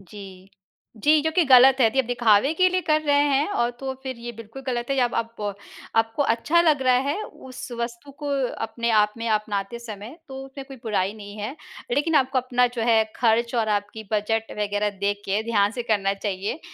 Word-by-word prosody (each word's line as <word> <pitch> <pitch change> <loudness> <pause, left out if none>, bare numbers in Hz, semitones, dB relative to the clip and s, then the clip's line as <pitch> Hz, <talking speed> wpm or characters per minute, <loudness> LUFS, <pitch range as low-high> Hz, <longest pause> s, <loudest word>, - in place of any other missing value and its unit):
जी। 190 -1 -12 0.6
जी, 305 +1 +5
जो 320 - +1
कि 355 - +5
गलत 260 0 +8
है, 240 - +6
यदि 265 +4 +2
दिखावे 240 +1 +3
के 370 +2 +4
लिए 370 0 0
कर 310 -1 +3
रहे 285 -1 +3
हैं 280 +1 +2
और 240 -12 +1
तो 265 -1 -3
फिर 260 -1 -5
ये 240 0 -6
बिल्कुल 230 +4 -10
गलत 240 -2 -2
है 275 - +1
या 255 - +4
अब 240 - -2
अप 225 -3 -3 0.4
आपको 225 +5 +2
अच्छा 285 +7 +2
लग 305 -5 +3
रहा 255 -1 +4
है 390 +9 -1
उस 255 -7 -10
वस्तु 235 +4 -5
को 295 -1 -5 0.4
अपने 235 0 -2
आप 210 -1 +3
में 230 - -4
अपनाते 210 0 -1
समय 225 +3 -9
तो 265 - -9
उसमें 270 0 -9
कोई 270 - -9
बुराई 205 -3 -1
नहीं 205 -1 -10
है। 215 +8 -5 0.4
लेकिन 320 -1 +1
आपको 265 -2 +3
अपना 250 0 +2
जो 230 - -1
है 225 -1 +5
खर्च 235 +1 +2
और 225 -2 +1
आपकी 205 +2 -11
बजट 220 +1 -1
वगैरह 205 0 0
देख 205 0 -1
के 200 +3 0
ध्यान 205 -3 +2
से - - 0
करना 205 -4 +1
चाहिए। 200 - -4
235 Hz, 210 wpm, -24 LUFS, 210-270 Hz, 0.6 s, गलत